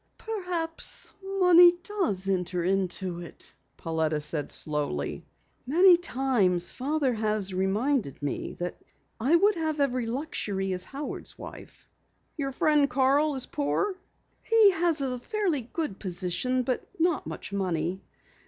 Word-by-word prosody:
"Perhaps 360 -7 -2 0.2
money 355 -2 +7
does 335 - -1
enter 180 -2 -1
into 185 -1 -1
it," 170 - -11 0.2
Pauletta 160 -2 -1
said 150 0 -2
slowly. 145 - -1 0.4
"Many 355 +6 +7
times 245 - +2
Father 280 0 0
has 215 -3 -1
reminded 200 - 0
me 145 -1 -4
that 175 0 -5 0.4
I 265 +9 +3
would 405 +5 +4
have 315 -4 -2
every 255 -4 0
luxury 205 -7 -2
as 180 0 -4
Howard's 280 +5 -6
wife." - - -11 0.5
"Your 275 -3 -3
friend 290 +1 +2
Carl 275 +3 +2
is 260 - +1
poor?" 345 +6 -1 0.5
"He 445 -3 +5
has 335 -4 0
a 255 -2 -2
fairly 370 - -1
good 250 - -4
position, 190 +7 -1
but 250 0 -2 0.2
not 335 -3 +1
much 200 - -7
money. 180 -1 -2
255 Hz, 125 wpm, -27 LUFS, -, 0.5 s, money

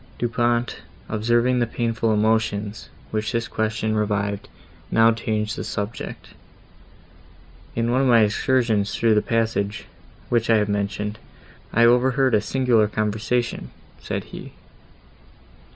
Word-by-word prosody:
Du 120 - 0
Pont, 120 0 0 0.3
observing 120 +3 +2
the 120 - +1
painful 115 -1 -1
emotions, 110 -1 0 0.2
which 110 0 -2
this 115 -1 -1
question 110 0 -1
revived, 100 -1 -1 0.4
now 115 0 +5
changed 110 -1 -2
the - - -5
subject. 105 +3 -5 1.5
"In 115 +1 0
one 130 +2 +2
of 135 - +2
my 120 -2 +6
excursions 110 -1 +1
through 115 -1 +3
the 105 - +3
passage, 110 -3 -1 0.4
which 115 -1 +1
I 115 - +6
have 105 -1 0
mentioned, 105 +1 -2 0.5
I 115 - +4
overheard 130 +2 +3
a 105 - +4
singular 120 -1 +2
conversation," 110 +3 -2 0.3
said - - -4
he. - - -9
110 Hz, 125 wpm, -23 LUFS, 105-120 Hz, 1.5 s, my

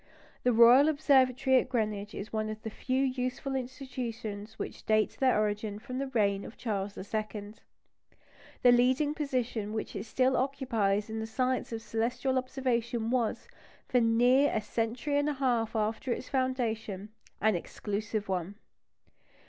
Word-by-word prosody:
The 250 - +3
Royal 240 +6 +7
Observatory 265 -3 +4
at - - -4
Greenwich 215 -4 -2
is 205 +2 -7
one 215 0 -1
of 215 0 -7
the 220 - -4
few 260 +4 -1
useful 255 +1 -2
institutions 235 -5 -5
which - - -6
date 215 -1 +2
their 255 -5 +3
origin 210 0 -1
from 255 +4 -6
the 275 - -2
reign 200 -6 +1
of 220 - -10
Charles 205 -3 -3
II. 210 0 -4 1.1
The 245 - +8
leading 255 +5 +3
position 245 -8 -2
which 220 - -4
it 200 - -4
still 260 +3 +2
occupies 225 -7 0
in 220 0 -4
the 220 - -3
science 255 +3 -1
of 225 -1 -5
celestial 245 +4 0
observation 240 -3 -1
was, 240 -4 0 0.4
for 250 - +3
near 245 +5 +4
a - - +1
century 235 +7 -1
and 290 +1 +1
a - - 0
half 240 -5 0
after 220 +3 -1
its 250 - -3
foundation, 225 -7 -2 0.3
an 220 0 +3
exclusive 205 +4 -3
one. 185 +1 -2
235 Hz, 150 wpm, -30 LUFS, 215-255 Hz, 1.1 s, The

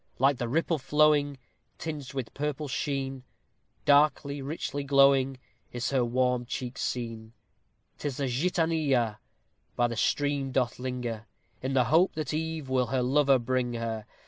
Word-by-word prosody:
Like 135 +1 +3
the 120 - -2
ripple 165 +3 +1
flowing, 145 0 +3 0.4
Tinged 145 -4 -6
with 130 -4 -4
purple 150 +1 -3
sheen, 135 -1 -3 0.6
Darkly, 145 -1 +3
richly 145 0 -4
glowing, 135 -1 +4 0.3
Is 120 +1 -2
her 130 -3 +2
warm 125 0 +1
cheek 125 +1 -5
seen. 115 -2 -4 0.7
'Tis 145 -4 -3
the 140 - -1
Gitanilla 140 -5 +1 0.6
By 120 - +2
the 115 - -4
stream 140 +3 0
doth 125 -2 0
linger, 125 -3 -4 0.3
In 130 +1 -2
the 130 -1 +4
hope 160 +10 +3
that 155 -1 -3
eve 160 -2 -3
Will 130 -1 +1
her 130 +1 0
lover 135 +1 +4
bring 125 0 -1
her. 115 -2 -4
135 Hz, 145 wpm, -28 LUFS, 125-145 Hz, 0.7 s, glowing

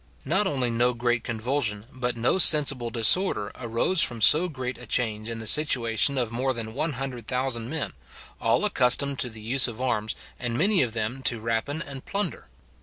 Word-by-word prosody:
Not 190 +8 +1
only 130 -6 -2
no 120 +1 0
great 120 -1 -2
convulsion, 115 -3 -3
but 125 -2 -4
no 120 +11 0
sensible 140 -8 +6
disorder, 115 - +3
arose 125 +9 +1
from 120 -5 +4
so 155 - +6
great 130 -4 -7
a 120 - -12
change 110 -2 -2
in 115 - -6
the 110 - -9
situation 135 -1 +2
of 120 -3 -2
more 130 +2 -3
than 110 -1 -7
100,000 130 -4 -4
men, 160 0 -5 0.5
all 115 - 0
accustomed 140 - +1
to 125 - 0
the 110 -1 -11
use 125 +5 +2
of 120 -1 -9
arms, 110 -4 -3 0.2
and 120 -1 -4
many 195 +4 +2
of 120 -4 -2
them 115 +4 -5
to 120 -2 +1
rapine 115 +8 -3
and 135 -2 -10
plunder. 200 +1 -5
125 Hz, 180 wpm, -24 LUFS, 115-140 Hz, 0.5 s, sensible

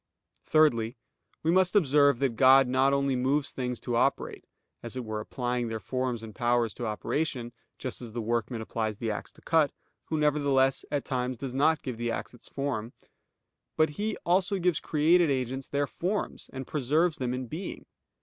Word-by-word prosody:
Thirdly, 120 -8 +3 0.5
we 160 - +3
must 185 +2 +3
observe 145 -6 +5
that 130 -2 0
God 130 +1 +7
not 130 +2 +3
only 140 -1 +1
moves 135 +4 +1
things 125 -2 -3
to 120 - -2
operate, 135 +4 0 0.4
as 120 +1 -7
it 125 - -4
were 110 -1 -3
applying 120 +2 -2
their 110 -1 -3
forms 125 -1 -2
and 110 -1 -8
powers 120 -2 +1
to 120 - -4
operation, 120 +2 -2 0.2
just 130 -2 -5
as 120 -2 -7
the 120 - -4
workman 115 +1 -1
applies 110 -1 -3
the 115 0 -2
axe 105 - -5
to - - -20
cut, 160 -3 +3 0.3
who 160 - -2
nevertheless 140 -3 +2
at 145 -2 -2
times 125 -1 -2
does 130 +1 -5
not 150 +4 +2
give 125 -4 -4
the 120 0 -2
axe 115 - -4
its 120 - -10
form; 130 -5 -3 0.8
but 155 0 +4
He 210 +7 -3
also 185 +3 +2
gives 180 -3 +1
created 160 +2 +3
agents 130 0 -2
their 145 0 0
forms 185 +8 -3
and 130 0 -6
preserves 155 +4 +1
them 125 -2 -2
in 130 0 -4
being. 160 +10 -6
130 Hz, 180 wpm, -28 LUFS, 120-150 Hz, 0.8 s, God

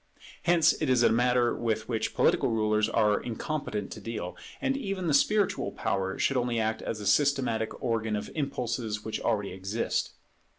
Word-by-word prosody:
Hence 170 -2 +5
it 155 - +1
is 125 -2 +4
a - - +5
matter 120 +1 +3
with 110 -2 -1
which 115 -3 -2
political - - +3
rulers 110 -1 +1
are 105 -1 +2
incompetent 115 -3 -4
to - - -8
deal; 100 -6 -5 0.2
and 270 0 0
even 195 -8 -3
the 155 - +1
spiritual 205 +7 +2
power 95 -1 -2
should 135 - +1
only 120 -2 0
act 110 0 -1
as 110 - -3
the 105 - -7
systematic 125 -2 +1
organ 110 -3 0
of 105 0 -5
impulses 120 -7 -3
which 110 -1 -3
already 100 -2 0
exist. 95 +5 -2
115 Hz, 170 wpm, -28 LUFS, 110-135 Hz, 0.2 s, Hence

